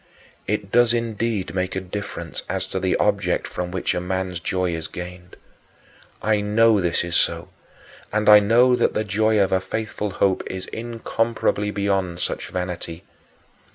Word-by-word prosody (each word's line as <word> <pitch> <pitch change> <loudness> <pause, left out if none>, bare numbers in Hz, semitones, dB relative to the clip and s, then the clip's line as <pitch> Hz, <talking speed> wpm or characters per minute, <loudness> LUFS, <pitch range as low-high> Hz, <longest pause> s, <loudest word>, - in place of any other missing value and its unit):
It 105 -1 -2
does 120 0 +4
indeed 115 -5 -2
make 95 0 -2
a - - 0
difference 95 +2 -6
as - - -1
to - - -2
the - - +1
object - - +1
from 90 0 -4
which 90 0 -1
a 90 - -2
man's 90 -1 -2
joy 90 0 -1
is 80 -1 -4
gained. 90 0 -9 0.9
I 110 -1 +2
know 105 0 +4
this 85 -1 +1
is 85 0 -3
so, - - +1 0.6
and 105 +1 0
I 105 0 +10
know 120 +5 +5
that - - +1
the 110 - +1
joy 110 +1 +2
of 95 -1 +3
a 95 - +2
faithful 105 +1 -3
hope 95 0 +1
is 95 0 -5
incomparably 115 -2 -1
beyond 95 -4 -1
such - - -3
vanity. 90 -2 -5
100 Hz, 160 wpm, -23 LUFS, 90-110 Hz, 0.9 s, I